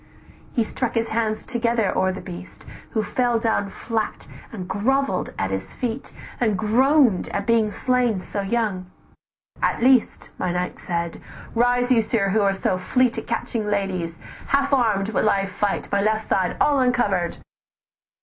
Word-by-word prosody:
"He 235 - +2
struck 240 +2 -3
his 230 0 0
hands 220 -1 -1
together 235 -4 0
o'er 190 0 +2
the 185 - -6
beast, 180 -1 -10 0.3
Who 220 - +1
fell 240 +1 +1
down 225 -3 0
flat, 220 +1 -3 0.3
and 185 -5 -6
grovell'd 260 0 0
at 95 0 -1
his 95 0 -4
feet, 245 +1 -4 0.3
And 220 -5 +2
groan'd 245 - +3
at 200 0 -2
being 225 -1 +3
slain 245 -2 +1
so 200 +2 -4
young: 195 -3 -1 0.7
'At - - +1
least, 255 -2 +3
"My 180 - 0
knight 180 +1 -3
said, 170 -1 -3 0.3
'Rise 245 +1 +2
you, 235 -3 +5
sir, 215 -2 0
who 210 +2 +2
are 200 -1 +3
so 185 -1 0
fleet 250 +6 +1
At - - -10
catching 230 -2 -2
ladies, 185 -5 -1 0.3
half 280 0 +2
arm'd 215 -6 +2
will 215 -1 +2
I 195 -1 +2
fight, 200 +1 -2
My 200 - +2
left 215 +1 0
side 185 -2 +1
all 290 -2 +3
uncovered! 210 -9 +1
220 Hz, 160 wpm, -23 LUFS, 195-240 Hz, 0.7 s, you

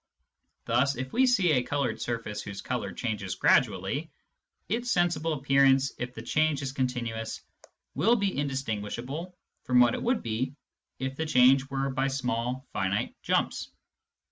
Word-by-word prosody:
Thus, 130 +4 +2
if 130 +1 -5
we 260 +1 +4
see 195 -9 +3
a 130 -4 +3
coloured 140 +1 -2
surface 115 -3 -3
whose 100 -2 -7
colour - - -3
changes 100 -6 -3
gradually, - - +2 0.6
its 240 +4 -1
sensible 165 -5 +1
appearance 135 -1 +3
if 120 +1 -4
the 115 - -7
change 155 +1 +1
is 135 - -3
continuous 120 -4 -3 0.5
will 210 - +3
be 200 -4 0
indistinguishable 135 - -3 0.3
from 125 -1 +4
what 120 -1 +5
it - - -3
would 245 0 0
be 120 +4 -2 0.4
if 130 +1 -4
the 160 - -1
change 130 0 +5
were 135 0 -1
by 135 +1 0
small 125 -1 -2
finite 95 +1 -1
jumps. - - 0
135 Hz, 145 wpm, -28 LUFS, 120-145 Hz, 0.6 s, what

